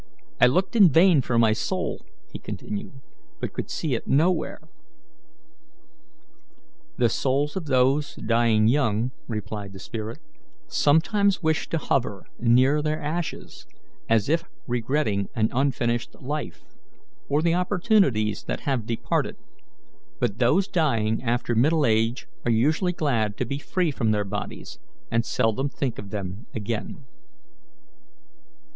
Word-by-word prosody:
I - - +7
looked 185 - +1
in 200 -6 +8
vain 165 0 +6
for 120 -1 -1
my 115 -2 +5
soul," 110 - -3 0.3
he - - -6
continued, 120 +6 -7 0.4
"but - - -4
could - - -5
see 155 -5 -2
it 115 - -3
nowhere." 160 +4 +1 2.4
"The 120 - +4
souls 140 +5 0
of 190 -4 -3
those 135 +2 +2
dying 115 -2 +2
young," 120 -2 +1 0.2
replied 105 -3 -5
the 95 - -10
spirit, 110 +3 -6 0.5
"sometimes 190 - +2
wish 160 -1 0
to 165 - 0
hover 125 -9 -1
near 130 +5 +4
their 155 +1 -1
ashes 155 - -5 0.4
as 110 -3 +3
if 165 +3 +2 0.2
regretting 120 -4 0
an 110 -2 +2
unfinished 120 -3 0
life, 135 - -5 0.7
or 150 +2 +2
the 170 -1 +3
opportunities 180 - +2
that - - -3
have 130 -6 -1
departed; 115 - -1 0.8
but 105 +4 -1
those 180 +11 +3
dying 115 - +1
after 120 0 -1
middle 145 +6 +3
age 115 +1 +1 0.2
are 120 - +1
usually 155 - +2
glad 115 -11 0
to 125 - -1
be 140 +4 -4
free 175 +1 0
from 115 -5 -1
their 105 -1 +1
bodies, 100 -11 -6 0.3
and 115 - +2
seldom 115 +5 0
think 135 -4 -3
of 100 - -8
them 100 +1 -6
again." 110 0 -4
125 Hz, 130 wpm, -25 LUFS, 110-155 Hz, 2.4 s, in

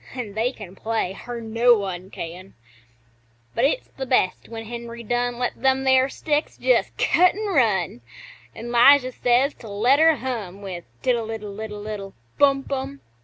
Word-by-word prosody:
(An' 230 -6 -5
they 225 +4 0
can 200 -7 -11
play, 220 -3 -2
er 240 -1 -4
no 230 +2 +4
one 190 -2 -5
can); 180 +2 -8 1.0
But 235 - +2
it's 315 - 0
the 265 -1 -7
best 215 -7 +1
when 225 -1 -7
Henry 235 0 -7
Dunn 245 +1 -1
Lets 245 0 -1
them 265 0 +2
there 260 0 +4
sticks 295 +2 -2
just - - +1
cut 360 +1 +4
an' 430 +1 -4
run, 215 - +1 0.5
An' 240 +1 -7
'Lijah 255 +2 +6
says 250 +3 +2
to 225 - -10
let 235 +8 +3
her 320 0 +6
hum 215 -8 -5
With 180 -3 -6 0.2
"Tiddle 235 -3 0
iddle 210 -3 -6
iddle 210 -1 -6
iddle 200 -2 -6 0.2
Bum 275 -1 +4
Bum!" 260 - -5
235 Hz, 170 wpm, -23 LUFS, 205-260 Hz, 1.0 s, Lijah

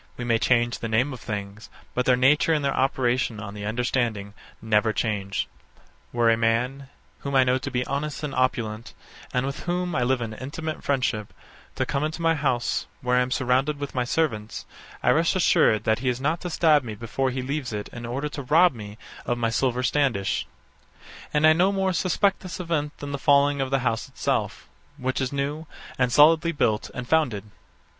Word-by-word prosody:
We 125 - -4
may 115 -1 +2
change 120 0 +2
the 115 - -3
name 120 +6 +1
of 125 - -8
things; 105 0 -6 0.2
but 125 - -1
their 125 - +6
nature 145 +6 +4
and 150 -2 0
their 140 - 0
operation 130 -3 0
on 100 -2 -7
the 105 0 -6
understanding 115 -3 -1 0.3
never 110 0 +2
change. 100 -4 -2 0.6
Were 120 -1 +3
a - - +4
man, 125 +4 0 0.3
whom 140 -1 -4
I 130 - +6
know 130 +1 +2
to 140 - -5
be 125 -2 -1
honest 150 +2 -3
and 145 -2 -3
opulent, 115 -3 -1 0.4
and 125 +1 0
with 135 0 -5
whom 180 0 -1
I 125 - 0
live 125 +1 +1
in 115 -2 -4
intimate 150 +6 -6
friendship, 125 -6 -1 0.4
to - - 0
come 140 - -1
into 155 +2 -3
my 165 -1 +3
house, 130 -6 -1
where 125 -1 +1
I - - +4
am 125 - -1
surrounded 130 +3 +1
with 140 -1 -5
my 125 - 0
servants, 120 -6 -2 0.4
I - - +4
rest - - +2
assured 110 -1 +3
that 110 +1 +1
he 130 +1 0
is 125 0 -1
not 155 +5 -1
to 180 - -4
stab 160 -3 +4
me 110 -3 -6
before 120 +5 -2
he 130 0 -3
leaves 140 -1 -3
it 105 -1 -4
in 120 - -9
order 130 +5 -3
to 145 -1 -6
rob 160 +6 +4
me 105 -2 -9 0.3
of 120 - 0
my 115 -1 0
silver 125 +1 0
standish; 125 -7 0 0.8
and 150 +1 +3
I 155 - +8
no 180 +4 +3
more 190 -1 0
suspect 190 +3 +1
this 185 -1 -7
event 155 -4 -2
than 145 0 -6
the 140 - -3
falling 140 0 +3
of 135 - -1
the 135 0 +1
house 115 -2 0
itself, - - -2 0.3
which 130 0 -2
is 130 - -1
new, 145 +3 -3 0.3
and 125 -1 +2
solidly 160 +4 +5
built 110 -7 0
and 125 -1 -6
founded. 130 -11 +1
130 Hz, 200 wpm, -25 LUFS, 115-145 Hz, 0.8 s, I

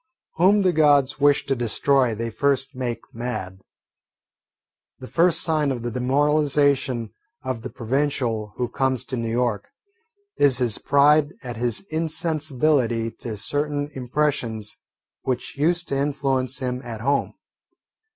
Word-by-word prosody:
Whom 195 +4 +4
the 185 -1 +3
Gods 145 -2 +3
wish 145 0 +3
to 135 - 0
destroy 125 +1 +1
they 115 +1 -4
first 135 +2 0
make 120 -3 -3
mad. 115 -6 -5 1.4
The 130 - -10
first 170 +3 +3
sign 155 -4 +1
of 120 -3 -4
the 120 - -3
demoralisation 140 -2 +1 0.3
of 130 -3 -3
the 130 - -6
provincial 120 -4 -1
who 125 - -1
comes 130 +1 -1
to 130 - -4
New 115 -2 -3
York 115 -3 -1 0.7
is 140 -4 +4
his 120 -5 +1
pride 145 +2 +4
at 120 -3 -6
his 120 -1 0
insensibility 150 -7 0
to 110 -3 -5
certain 145 +5 -2
impressions 125 -5 -1 0.5
which 130 -2 -3
used 170 +4 +1
to 140 - 0
influence 135 -2 0
him 125 -1 -3
at 115 -3 -7
home. 140 +3 0
130 Hz, 130 wpm, -23 LUFS, 120-145 Hz, 1.4 s, Whom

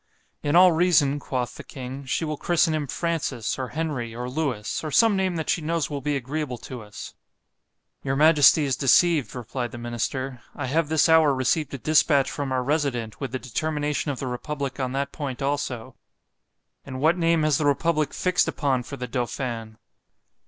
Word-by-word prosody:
In 145 +1 0
all 180 +1 +8
reason, 160 -4 +3
quoth 125 -3 -3
the - - -8
king—she 135 +3 -4
will 155 0 -2
christen 165 +1 +2
him 150 -2 -2
Francis, 160 -7 -2
or 130 - -2
Henry, 135 -7 -3
or 125 +1 -4
Lewis, 125 -6 -2
or 155 - -3
some 225 +7 +4
name 190 -2 0
that 160 -2 -3
she 170 - +1
knows 160 -1 -1
will 140 -1 -3
be 145 +1 -1
agreeable 135 0 -3
to 125 +1 -8
us. 105 -1 -9 0.9
Your 135 -1 -1
majesty 150 0 +6
is 135 -2 0
deceived, 140 - +3
replied 125 0 -4
the - - -8
minister——I 120 +3 -4
have 155 +4 0
this 160 0 +3
hour 160 -4 +5
received 140 +3 0
a - - -4
dispatch 145 -1 +3
from 140 -2 -4
our 130 -1 0
resident, 130 -7 -1
with 135 -3 -3
the 130 - -2
determination 150 +4 -2
of 140 - -2
the 135 - -4
republic 140 +2 -4
on 130 -1 -1
that 140 0 -2
point 140 -4 -5
also.——And 135 -1 -7
what 160 +5 +3
name 165 -2 +2
has 155 -3 +2
the 155 - 0
republick 155 +1 +1
fixed 185 -1 +1
upon 135 -4 0
for 140 +3 -8
the 125 - -5
Dauphin? 120 -2 -4
140 Hz, 180 wpm, -25 LUFS, 125-155 Hz, 0.9 s, all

